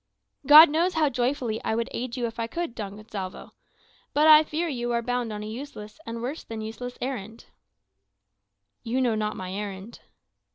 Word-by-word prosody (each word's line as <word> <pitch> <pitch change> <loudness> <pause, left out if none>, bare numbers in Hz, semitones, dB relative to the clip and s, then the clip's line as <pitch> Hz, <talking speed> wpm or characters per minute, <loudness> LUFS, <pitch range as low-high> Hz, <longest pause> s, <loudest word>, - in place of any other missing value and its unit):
"God 305 +3 +11
knows 340 +4 +1
how 310 -2 +3
joyfully 245 -3 -1
I 220 - 0
would 230 0 -1
aid 250 +1 -4
you 245 - -1
if 230 0 -6
I 230 - -1
could, 335 0 -4
Don 205 -4 -6
Gonsalvo. 205 -3 -7 0.6
But 300 +1 +4
I 310 -1 +9
fear 315 +3 -2
you 240 -5 -3
are 235 0 0
bound 245 -1 -2
on 210 0 -5
a - - -6
useless, 220 -1 -8
and 230 0 -5
worse 275 +6 -4
than 225 -1 -7
useless, 235 +3 -7
errand." 230 -4 -5 1.4
"You 240 +3 -2
know 245 -3 +2
not 215 0 -2
my 185 0 -6
errand." 200 +2 -6
235 Hz, 180 wpm, -26 LUFS, 215-270 Hz, 1.4 s, God